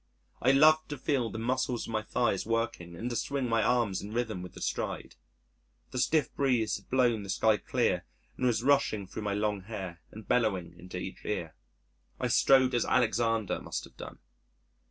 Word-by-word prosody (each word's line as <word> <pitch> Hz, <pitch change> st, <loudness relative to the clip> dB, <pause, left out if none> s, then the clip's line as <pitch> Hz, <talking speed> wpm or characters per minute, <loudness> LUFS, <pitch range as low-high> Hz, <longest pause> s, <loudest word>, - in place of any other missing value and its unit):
I 130 Hz, -, +5 dB
loved 155 Hz, +3 st, +5 dB
to 145 Hz, -, -4 dB
feel 130 Hz, -4 st, 0 dB
the -, -, -6 dB
muscles 125 Hz, +1 st, -1 dB
of -, -, -7 dB
my 110 Hz, -, +1 dB
thighs 110 Hz, -2 st, 0 dB
working, 115 Hz, -7 st, -2 dB
and 115 Hz, +8 st, -4 dB
to -, -, -2 dB
swing 140 Hz, +1 st, -1 dB
my 115 Hz, -1 st, +2 dB
arms 115 Hz, -4 st, +1 dB
in 105 Hz, -, -7 dB
rhythm 110 Hz, -5 st, -2 dB
with 90 Hz, -, -9 dB
the -, -, -10 dB
stride. -, -, -3 dB, 0.8 s
The 125 Hz, -, -3 dB
stiff 155 Hz, +3 st, +2 dB
breeze 125 Hz, -6 st, +1 dB
had 100 Hz, -, -18 dB
blown 120 Hz, -4 st, +2 dB
the 100 Hz, -, -9 dB
sky 110 Hz, +2 st, +3 dB
clear, -, -, 0 dB, 0.3 s
and 125 Hz, -, 0 dB
was 115 Hz, -1 st, +1 dB
rushing 130 Hz, -7 st, +2 dB
through 95 Hz, -, -7 dB
my 100 Hz, -1 st, -1 dB
long 105 Hz, -1 st, -1 dB
hair, 95 Hz, -4 st, -7 dB
and 110 Hz, 0 st, -11 dB
bellowing 105 Hz, -8 st, +1 dB
into 90 Hz, +1 st, -8 dB
each 90 Hz, +1 st, -7 dB
ear. 85 Hz, -6 st, -3 dB, 0.7 s
I -, -, 0 dB
strode 130 Hz, -1 st, +5 dB
as 120 Hz, -, +2 dB
Alexander 115 Hz, -3 st, +1 dB
must -, -, -4 dB
have -, -, -14 dB
done! -, -, -9 dB
115 Hz, 190 wpm, -30 LUFS, 105-125 Hz, 0.8 s, I